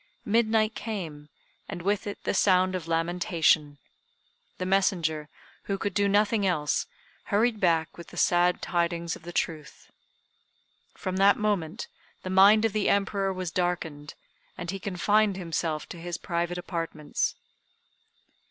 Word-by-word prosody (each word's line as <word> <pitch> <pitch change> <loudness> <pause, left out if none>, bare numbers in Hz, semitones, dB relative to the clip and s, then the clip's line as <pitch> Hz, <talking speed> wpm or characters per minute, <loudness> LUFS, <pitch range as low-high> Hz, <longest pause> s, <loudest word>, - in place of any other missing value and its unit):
Midnight 220 0 +2
came, 165 -11 -6 0.4
and 170 - -6
with 205 +2 0
it 205 - -6
the - - 0
sound 185 -1 +3
of 180 -3 -4
lamentation. 165 -3 +1 0.8
The 185 - -3
messenger, 170 -6 +1 0.4
who 195 - -1
could 200 0 -3
do 200 +1 +2
nothing 205 +1 +2
else, 160 -6 0 0.4
hurried 220 +2 +1
back 165 -4 +1
with 170 - -9
the - - -12
sad 175 0 +3
tidings 170 -1 -1
of - - -13
the 175 +1 -8
truth. 155 -4 -4 1.0
From 185 0 -4
that 200 +1 +5
moment 200 -7 -1 0.4
the 185 - -4
mind 200 +4 +6
of 225 - 0
the 215 -2 +1
Emperor 195 -1 +1
was 185 -2 -4
darkened, 165 -5 -2 0.4
and 180 -1 -4
he 195 - -5
confined 200 +2 +1
himself 165 -3 -2
to - - -8
his 175 0 -4
private 175 0 -2
apartments. 165 -4 -3
180 Hz, 140 wpm, -27 LUFS, 165-200 Hz, 1.0 s, mind